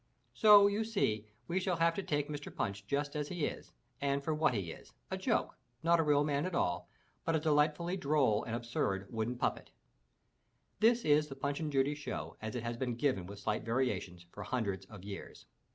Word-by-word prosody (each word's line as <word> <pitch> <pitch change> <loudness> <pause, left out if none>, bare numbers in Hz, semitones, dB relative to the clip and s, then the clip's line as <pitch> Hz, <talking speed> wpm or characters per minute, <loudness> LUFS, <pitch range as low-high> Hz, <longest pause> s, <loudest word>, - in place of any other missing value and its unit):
So 210 -2 +8
you 205 +2 +2
see 110 - 0 0.2
we 180 +3 0
shall 185 -1 0
have 165 0 +3
to 200 - -2
take 145 -6 -1
Mr. 145 -1 -6
Punch 100 0 -3
just 145 +2 -1
as 150 -1 -1
he 175 -3 -1
is - - -6 0.3
and 140 0 0
for 155 - 0
what 155 -5 +2
he 95 -6 -2
is— - - -12 0.2
a - - 0
joke, - - 0 0.3
not 170 +1 +4
a - - +4
real 145 -1 +4
man 145 +3 0
at 185 - -4
all, 90 - 0 0.3
but 165 - +1
a - - +3
delight 150 0 +3
fully 175 +3 -3
droll 140 - +2
and 115 - -3
absurd 115 -5 -1
wooden 115 +1 -1
puppet. - - -1 1.1
This 235 +2 +4
is 150 0 +4
the 135 - -7
Punch 140 +1 -2
and 155 -2 -2
Judy 135 +1 +2
show 145 0 -5
as 110 +2 -4
it 120 - -3
has 115 0 -3
been 125 -1 -2
given 120 -8 0
with 100 +1 -8
slight 105 +1 -1
variations 105 -8 -1
for 105 - -9
hundreds 100 -4 -2
of 100 -4 -11
years. 100 -1 -8
140 Hz, 210 wpm, -34 LUFS, 110-160 Hz, 1.1 s, So